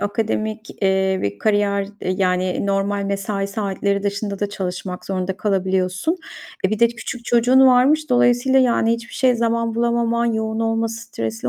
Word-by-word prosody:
akademik, 215 +1 -2
eee, 190 0 +2
bir 100 0 -3
kariyer, 205 -1 +1 0.2
eee, - - -2
yani, 185 0 0
normal 200 0 0
mesai 195 0 -2
saatleri 200 -1 -2
dışında 200 0 -3
da 205 - -1
çalışmak 185 -2 -5
zorunda 185 -1 -2
kalabiliyorsun. 190 - 0 0.5
E, - - -4
bir 215 - -1
de 235 - +5
küçük 240 +1 -7
çocuğun 245 +3 +4
varmış. 275 +4 +4
Dolayısıyla, 245 +2 +3
yani, 235 -2 +2
hiçbir 235 +1 -5
şeye 255 -2 +3
zaman 230 0 0
bulamaman, 235 0 +1
yoğun 220 -1 -1
olması, 225 0 -1
stresli 115 - -4
215 Hz, 150 wpm, -20 LUFS, 195-235 Hz, 0.5 s, de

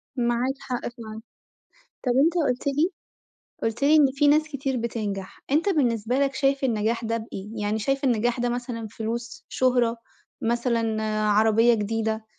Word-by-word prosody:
معاك 240 +2 +1
حق 250 -2 -3
فعلًأ، 225 -2 -7 0.9
طَب 245 - +3
أنتَ 335 +1 +2
قُلت 250 +2 -2
لي 300 +6 +2 0.7
قُلت 225 +4 -2
لي 305 +2 +6
إن 295 -2 +7
في 290 +1 +3
ناس 305 +2 +5
كتير 270 -2 -2
بتنجح، 210 -5 -4
أنتَ 315 +7 +2
بالنسبة 245 - +1
لك 275 -1 +1
شايِف 275 -1 +1
النجاح 230 -1 0
ده 230 +1 0
بإيه؟ 210 -3 -7
يعني 210 +1 0
شايِف 275 +6 -1
النجاح 240 0 +1
ده 245 - +1
مثلًا 240 -2 -4
فلوس، 230 +3 -5
شُهرة، 245 -2 +2 0.5
مثلًا 230 -2 0 0.3
عربية 225 +3 +4
جديدة، 220 +1 -2
235 Hz, 150 wpm, -25 LUFS, 225-270 Hz, 0.9 s, إن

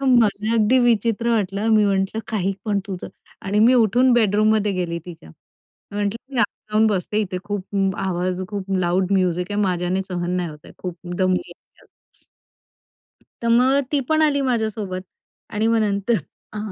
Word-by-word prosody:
हां, 275 - +1
मला 220 -2 +3
अगदी 230 +3 +4
विचित्र 235 -1 +2
वाटलं, 205 0 0
मी 210 -1 +5
म्हंटलं 195 +2 0
काही 195 -3 0
पण 205 -2 +1
तुझं 185 -3 -6 0.4
आणि 205 +2 +1
मी 240 +4 +6
उठून 245 +2 +4
बेडरूममध्ये 215 -2 +3
गेली 175 -2 -2
तिच्या 160 - -11 0.6
म्हंटलं 210 +6 -3
मी - - -1
आत 210 - +4 0.3
जाऊन 220 +1 +4
बसते 210 +1 0
इथे 185 -3 -3
खूप 200 -1 -2
आवाज 185 0 -1
खूप 200 -2 -5
लाउड 185 +2 +1
म्युझिक 180 -2 +1
आहे 205 - 0
माझ्याने 180 0 0
सहन 175 -1 -3
नाही 175 -2 -1
होत 150 - -11
आहे - - -13
खूप 180 -2 -5 0.2
दमली 185 -1 0
आहे. - - -27 1.6
तर 235 - 0
मग 255 +4 +4
ती 290 - +2
पण 315 0 +3
आली 290 -2 +3
माझ्यासोबत 220 -6 -1 0.5
आणि 215 +2 0
मग 230 0 +3
नंतर 205 +2 +1 0.4
अ, 215 - -6
205 Hz, 165 wpm, -22 LUFS, 185-230 Hz, 1.6 s, मी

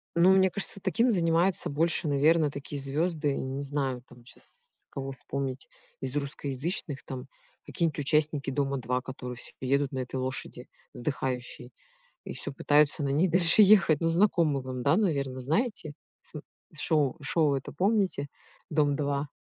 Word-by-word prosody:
Но 175 +3 +6
мне 190 0 +5
кажется 195 +1 -3
таким 230 +6 +2
занимается 170 0 +1
больше, 160 +3 +1
наверное, 150 +2 +3
такие 140 0 -6
звезды, 150 +1 0
не 135 +2 -4
знаю 135 -3 -2
там, 120 -1 -17
щас 485 - -16 0.2
кого 135 -1 -5
вспомнить 135 0 -5 0.3
из 130 +1 -5
русскоязычных, 140 +2 -3
там, 130 0 -7 0.4
какие-нибудь 165 -4 -1
участники 150 -1 +2
"Дома-2", 130 -3 -1
которые 125 -1 -7
всё - - -10
едут 140 +1 +1
на 130 - -4
этой 130 +1 -5
лошади, 130 0 -4 0.3
сдыхающей, 125 -2 -4 0.5
и - - -6
всё - - -6
пытаются 145 +2 +2
на 140 - 0
ней 155 +7 +2
дальше 175 +3 +5
ехать. 190 -7 +5
Ну 165 - +2
знакомы 165 -6 +2
вам, 130 -1 -5
да, 145 +4 +4
наверное, 140 -10 -1
знаете? 160 - -1 0.4
См 150 - -9 0.3
шоу, 155 -2 +1
шоу 145 0 +2
это 135 - -5
помните, 190 -5 +1 0.4
"Дом-2"? 145 -2 0
145 Hz, 145 wpm, -28 LUFS, 135-165 Hz, 0.5 s, Но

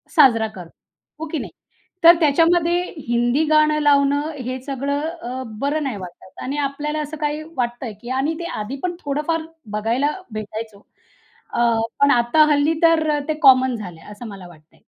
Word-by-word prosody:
साजरा 235 -8 +5
करतो. 185 -6 -11 0.5
हो 320 - -4
की 320 - -1
नाही? - - -7 0.5
तर 340 +1 +9
त्याच्यामध्ये 335 +3 +3 0.3
हिंदी 240 +5 +2
गाणं 305 0 +3
लावणं 285 +1 +3 0.2
हे 255 +1 -3
सगळं 280 +1 -2
अ, 260 -6 -6 0.2
बरं 290 +3 -1
नाही 265 -7 -3
वाटत 185 0 -11
आणि 275 +3 -3
आपल्याला 295 +2 -3
असं 300 +1 -6
काही 300 0 -2 0.2
वाटतंय 240 -1 -3
की 240 - -9
आणि 285 +4 0
ते 340 - -5
आधीपण 275 +11 -4
थोडं 290 -2 -2
फार 330 -1 +1 0.3
बघायला 230 +7 0 0.2
भेटायचो 215 -1 -7 0.7
अ, - - -1 0.4
पण 280 0 +6
आता 240 +5 +4
हल्ली 295 +2 +3
तर 315 -2 +3
ते 310 - +1
कॉमन 260 -3 +6
झालंय, 180 -7 -8
असं 210 +3 -9
मला 195 -4 -10
वाटतंय. 155 -2 -19
275 Hz, 160 wpm, -21 LUFS, 235-305 Hz, 0.7 s, तर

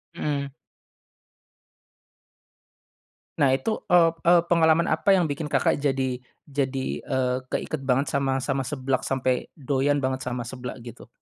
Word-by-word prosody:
Mmm. 140 -2 -2 2.9
Nah 135 -2 +4
itu, 215 +12 -2
eee 170 -2 +5 0.2
eee, 175 -1 +7
pengalaman 165 0 +4
apa 195 +5 +3
yang 180 - +3
bikin 150 +2 -3
Kakak 145 - +1
jadi 130 -3 -1 0.3
jadi, 135 -1 -2
eee, 125 -1 -1
keiket 155 - -3
banget 135 +2 +1
sama 135 -1 0
sama 135 -2 -1
seblak 130 -2 -2
sampai 130 -1 0
doyan 140 0 0
banget 130 0 0
sama 120 -1 -3
seblak 125 +1 -7
gitu? 120 - -11
135 Hz, 130 wpm, -25 LUFS, 130-150 Hz, 2.9 s, eee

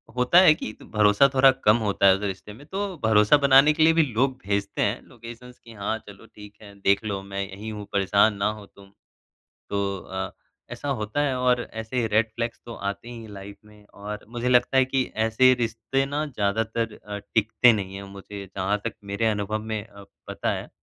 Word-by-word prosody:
होता 125 +8 +5
है 175 -5 +7
कि 110 - -6
भरोसा 105 +4 +3
थोड़ा 135 0 +6 0.2
कम 105 +2 +6
होता 100 -3 +2
है 95 - +7
उस 95 - -7
रिश्ते 100 +1 -5
में। 130 +7 -14
तो 195 +4 -3 0.2
भरोसा 110 +4 +5
बनाने 140 +1 +6
के 155 +1 +2
लिए 165 +1 +6
भी 165 - +4
लोग 130 +3 +1
भेजते 100 0 -2
हैं 105 +5 0
लोकेशन्स 120 +1 -12
कि 115 - -15
हाँ, 110 +1 -3
चलो 100 -1 -13
ठीक 105 0 -12
है 100 -1 -13
देख 100 +2 +2
लो 100 -2 -3
मैं 100 0 -5
यहीं 105 +3 -7
हूँ, 105 -1 -7
परेशान 100 +2 +3
ना 100 +1 +1
हो 105 - -12
तुम। 100 0 -18 0.8
तो 100 -1 -1
अ, 95 +1 -5 0.4
ऐसा 145 - -5
होता 110 +7 -2
है 140 -3 0
और 125 -1 +2
ऐसे 110 +2 -2
रेड 110 +1 +2
फ़्लैग्स 115 0 -4
तो 120 - -8
आते 100 +4 -5
ही 120 -1 -8
हैं 110 - -11
लाइफ़ 100 0 -10
में। 105 0 -18
और 105 +1 -8
मुझे 120 +1 -2
लगता 125 +1 +3
है 130 - +5
कि 130 0 0
ऐसे 115 +4 +4
रिश्ते 115 +4 -1
ना 145 +2 -2
ज़्यादातर 110 -2 -2
अ, 105 0 -8
टिकते 110 +3 +3
नहीं 95 -3 -4
है 100 - -7
मुझे 100 0 -9
जहाँ 95 +2 0
तक 115 - -3
मेरे 100 +3 -1
अनुभव 105 0 -1
में 105 -1 -3
अ, 100 -2 -14 0.2
पता - - -2
है। - - -6
110 Hz, 205 wpm, -24 LUFS, 100-125 Hz, 0.8 s, है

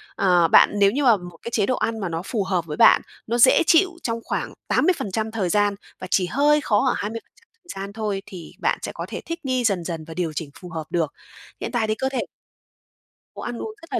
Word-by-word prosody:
À, 180 -3 +4
bạn - - +6
nếu 200 -1 +5
như 285 +5 -1
mà 235 -5 +6
một 175 -2 -11
cái 235 - -6
chế 210 -3 +2
độ 255 - 0
ăn 225 -2 -2
mà 190 -4 -3
nó 165 0 -3
phù 210 -1 -1
hợp 185 -3 -1
với 150 -2 -6
bạn, 230 - +7 0.3
nó 235 +2 0
dễ 255 +6 +6
chịu 365 +3 +5
trong 230 -1 -2
khoảng - - -3
80% 220 - 0
thời 205 -5 -1
gian, 205 +2 +2 0.2
và - - -6
chỉ 185 - +3
hơi 295 +8 +3
khó 215 -4 +2
ở - - +2
20% 230 - -7 0.2
thời 195 - -6
gian 200 +1 -8
thôi, 210 -3 -2
thì 180 -5 -10
bạn - - 0
sẽ - - -4
có - - -5
thể - - -5
thích 335 +1 -4
nghi 255 -2 0
dần 195 -6 +1
dần 165 -2 -5
và 165 - -7
điều 165 -2 -2
chỉnh 155 -1 -4
phù 180 - -10
hợp 165 -2 -5
được. 165 -4 -1 0.5
Hiện - - -4
tại 230 -3 0
thì 215 - 0
cơ 265 +4 -1
thể 265 -3 -2 1.1
có - - -7
ăn 240 - -4
uống 440 - -5
rất 330 -4 -13
là - - +1
210 Hz, 250 wpm, -23 LUFS, 180-240 Hz, 1.1 s, bạn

